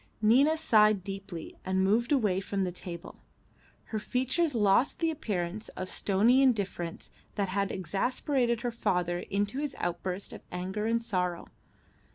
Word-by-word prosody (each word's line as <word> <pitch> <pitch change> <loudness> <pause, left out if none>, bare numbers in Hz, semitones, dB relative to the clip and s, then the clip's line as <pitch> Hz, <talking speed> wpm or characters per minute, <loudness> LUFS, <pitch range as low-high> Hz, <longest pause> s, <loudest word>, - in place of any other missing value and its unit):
Nina 265 +9 +4
sighed 215 - +4
deeply 195 -4 -7
and 190 0 +1
moved 225 +6 +2
away 210 -10 +2
from 195 0 -2
the 180 - -1
table. 170 -1 -8 0.7
Her 215 - 0
features 260 +7 0
lost 210 +5 +3
the 330 -1 +1
appearance 210 - -3
of 185 0 -4
stony 220 +7 +3
indifference 200 -9 0 0.2
that 200 -2 0
had 200 +1 0
exasperated 235 - 0
her 245 -1 -1
father 180 -6 0
into 205 +7 -2
his 290 -2 -3
outburst 180 +2 -3
of - - -9
anger 190 +4 -3
and 230 +1 +1
sorrow. 180 -6 -2
205 Hz, 145 wpm, -29 LUFS, 185-240 Hz, 0.7 s, Nina